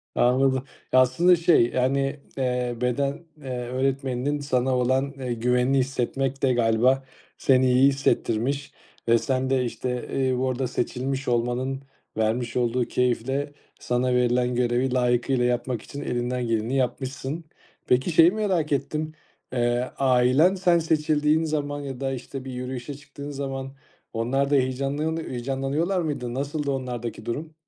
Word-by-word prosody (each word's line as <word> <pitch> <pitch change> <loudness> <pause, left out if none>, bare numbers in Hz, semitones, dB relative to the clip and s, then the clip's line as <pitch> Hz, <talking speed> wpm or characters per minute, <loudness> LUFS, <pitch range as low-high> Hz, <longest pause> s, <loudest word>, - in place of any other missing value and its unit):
Anladım, 130 +1 +3 0.3
aslında 130 +8 +5
şey 165 -7 +4
yani, 135 +2 0 0.2
eee, 125 -2 -1
beden, 140 +5 -1
eee, 135 -3 -9 0.2
öğretmeninin 135 +2 -1
sana 130 -2 0
olan, 130 +3 +1
eee, 130 -3 -4
güvenini 125 +3 +2
hissetmek 135 +1 -1
de 130 -2 +4
galiba 120 +3 +3 0.3
seni 130 -1 +3
iyi 130 +2 +6
hissettirmiş 135 0 0 0.4
ve 115 0 +5
sen 130 +2 -1
de, 130 -2 +2
işte, 125 +1 -3 0.2
ııı, 125 - 0
burada 130 0 0
seçilmiş 130 +2 -2
olmanın 125 +3 -1 0.3
vermiş 115 +2 0
olduğu 120 0 +1
keyifle 135 +4 -1 0.3
sana 125 +1 0
verilen 125 0 +2
görevi 125 +1 +1
layıkıyla 125 0 +2
yapmak 120 -1 -1
için 145 - -8
elinden 125 0 -2
geleni 115 +3 0
yapmışsın. 135 +4 -2 0.4
Peki 130 +7 +2
şeyi 165 +2 +6
merak 190 -8 0
ettim, 150 +3 -1 0.4
eee, 120 0 0
ailen 135 +7 +4
sen 175 -2 +3
seçildiğin 155 0 +2
zaman 145 -2 -2
ya 135 -2 -6
da, 135 -1 -1
işte, 130 +1 -6
bir 130 - -6
yürüyüşe 125 +2 -5
çıktığın 145 0 -9
zaman 135 -1 -5 0.4
onlar 135 +5 0
da 145 - +3
heyecanlanı 140 +5 0
heyecanlanıyorlar 135 +8 -1
mıydı? 130 -6 -3
Nasıldı 145 +1 -2
onlardaki 120 -4 -4
durum? 155 +7 -4
130 Hz, 135 wpm, -25 LUFS, 125-140 Hz, 0.4 s, iyi